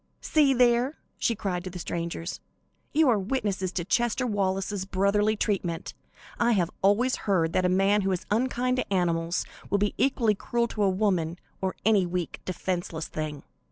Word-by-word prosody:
"See 290 -4 +3
there!" 245 +3 +3 0.2
she 230 - +1
cried 185 -4 -3
to 185 - -5
the 180 - -8
strangers, 170 0 -4 0.5
"you 315 0 +4
are 230 -5 +4
witnesses 195 -4 -1
to 175 - -2
Chester 240 +4 +1
Wallace's 195 -2 -1
brotherly 200 +3 +2
treatment. 180 -6 -2 0.5
I 235 0 +4
have 180 -5 +1
always 220 +7 +3
heard 165 -4 +2
that 185 - +2
a - - +1
man 195 +3 +3
who 195 0 0
is 180 - -2
unkind 250 +2 +1
to 255 - -2
animals 170 -2 0 0.2
will 200 - +2
be 205 0 +1
equally 245 -5 +3
cruel 235 +3 -1
to 205 -2 +1
woman, 185 -4 0 0.2
or 190 -1 -1
any 205 -4 +4
weak, 175 -1 -3
defenceless 175 -3 -3
thing." 150 -2 -4
195 Hz, 165 wpm, -27 LUFS, 180-230 Hz, 0.5 s, you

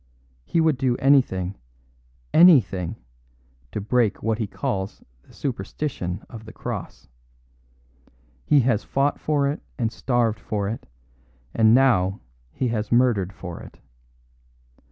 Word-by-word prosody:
He 165 - 0
would 160 -5 +2
do 125 -3 +1
anything, 100 -9 +2 0.8
anything, 125 - +5 0.8
to - - -3
break 110 0 0
what 110 0 0
he 110 - -1
calls 100 -4 -4 0.2
the - - -22
superstition 105 -5 -4
of 110 -2 -11
the 110 - -10
Cross. - - -7 1.4
He 145 -2 +4
has 120 -4 +1
fought 140 +1 0
for 145 -2 +1
it 145 +2 -3 0.2
and 115 -3 -1
starved 120 -4 0
for 105 -3 -3
it, 110 +3 -5 0.7
and 110 0 +5
now 105 -8 +3 0.3
he 125 - -2
has 110 -2 -3
murdered 120 -6 +3
for 90 -3 -8
it. - - -13
115 Hz, 125 wpm, -23 LUFS, 100-135 Hz, 1.4 s, anything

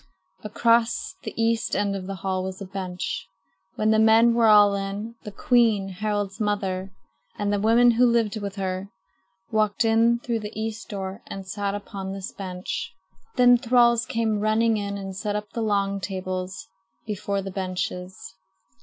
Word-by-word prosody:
Across 230 +2 +1
the - - -6
east 230 0 +1
end 200 -1 0
of 185 -1 -5
the 195 - -4
hall 185 -1 0
was 190 0 -5
a 200 - -6
bench. 185 -2 -4 0.5
When 215 0 +2
the 220 - +4
men 225 +2 +6
were 230 -1 +4
all 205 -1 +7
in, 200 +3 -4
the 210 - -6
queen, 220 -3 +2
Harald's 205 0 -3
mother, 195 -3 -1 0.5
and 205 0 0
the 205 - +1
women 230 +3 +5
who 245 +2 +4
lived 230 -2 +1
with 200 -1 -5
her, 190 0 -3 0.6
walked 215 +1 +1
in 225 +1 +4
through 235 -1 -2
the 210 0 -7
east 225 +1 -4
door 195 0 -5
and 195 -1 -7
sat 200 0 -2
upon 195 -1 -6
this 195 -1 -6
bench. 185 0 -5 0.4
Then 245 -1 +6
thralls 235 -1 +3
came 220 -2 0
running 220 +1 +2
in 200 -1 -3
and 195 -1 -6
set 205 +1 -3
up 210 0 -4
the 230 - -2
long 200 -2 0
tables 185 -1 -5 0.4
before 200 -2 -2
the 195 - -5
benches. 185 0 -4
205 Hz, 165 wpm, -25 LUFS, 195-225 Hz, 0.6 s, all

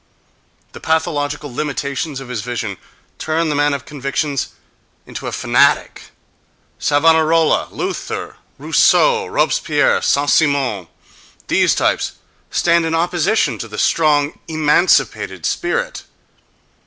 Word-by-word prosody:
The - - -11
pathological 150 -3 -2
limitations 140 +1 -3
of 135 - -9
his 120 -4 -3
vision 115 -4 -4 0.4
turn 160 +1 -1
the 150 - -1
man 145 0 +2
of 140 0 -7
convictions 140 -1 -2 0.6
into - - -7
a - - -3
fanatic—Savonarola, 160 +2 +1
Luther, 375 +1 -5 0.2
Rousseau, 465 -2 +3
Robespierre, 485 +1 +1
Saint 145 +1 +1
Simon—these 135 - -1
types - - 0 0.4
stand 170 -1 +2
in 160 - -1
opposition 170 - 0
to 115 - -5
the 105 -1 -9
strong, 150 0 +1
emancipated 155 +2 +1
spirit. 480 +8 -2
150 Hz, 100 wpm, -18 LUFS, 140-165 Hz, 0.6 s, Rousseau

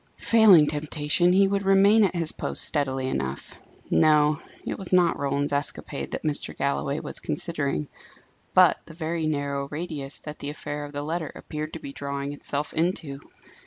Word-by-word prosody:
Failing 210 -9 +6
temptation, 150 +3 +1
he 195 +2 +5
would 200 0 0
remain 200 +3 +5
at 190 -2 +1
his 165 -2 0
post - - -1
steadily 135 -3 0
enough. 65 - -4 0.3
No; 150 - +4 0.3
it - - -4
was 190 - -6
not 180 -2 +3
Roland's 140 +1 -1
escapade 140 0 -3
that - - -5
Mr. 150 -2 -1
Galloway 70 0 -1
was - - -6
considering; 75 0 -2 0.7
but - - +6
the 165 - -13
very 160 -1 -2
narrow 140 -2 -2
radius 150 -3 -5
that 150 0 -8
the 145 - -4
affair 145 0 -5
of 145 - -10
the 145 0 -4
letter 160 +1 -3
appeared 155 +1 -6
to 165 - -6
be 140 - -8
drawing 140 0 -4
itself 145 +1 -3
into. 160 -4 -1
150 Hz, 165 wpm, -25 LUFS, 140-170 Hz, 0.7 s, Failing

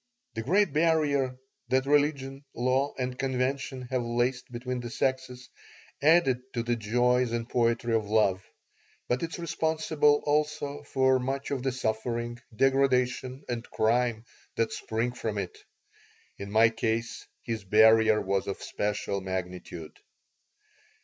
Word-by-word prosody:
The 115 - -3
great 185 - +2
barrier 150 -5 +2 0.3
that 130 +1 +2
religion, 140 -1 +1
law, 130 +3 +1
and 125 0 -3
convention 130 0 -1
have 130 -1 +1
laced 120 +2 -1
between 125 +1 -4
the 120 -1 -6
sexes 130 0 -2 0.5
adds 150 -4 +4 0.2
to 115 - 0
the 120 0 0
joys 125 +2 +1
and 115 -1 -2
poetry 115 -1 +1
of 110 -2 +1
love, 100 -3 +2 0.6
but 125 +1 0
it 165 -1 -3
is - - -4
responsible 160 -3 +1
also 145 -1 0
for 130 -1 +2
much 135 +2 -3
of 135 -3 -1
the 135 +1 0
suffering, 120 0 -2 0.2
degradation, 130 0 +1
and 120 -1 -4
crime 115 0 +1 0.3
that 115 -1 0
spring 115 +2 -2
from 110 -4 -4
it. 95 -3 -4 0.8
In 100 0 -6
my 110 +2 +5
case 115 +1 -2 0.2
his 115 -3 -4
barrier 110 +2 +5
was 95 0 -1
of 100 - -3
special 105 -1 -2
magnitude. 90 -3 -6
125 Hz, 135 wpm, -28 LUFS, 115-135 Hz, 0.8 s, my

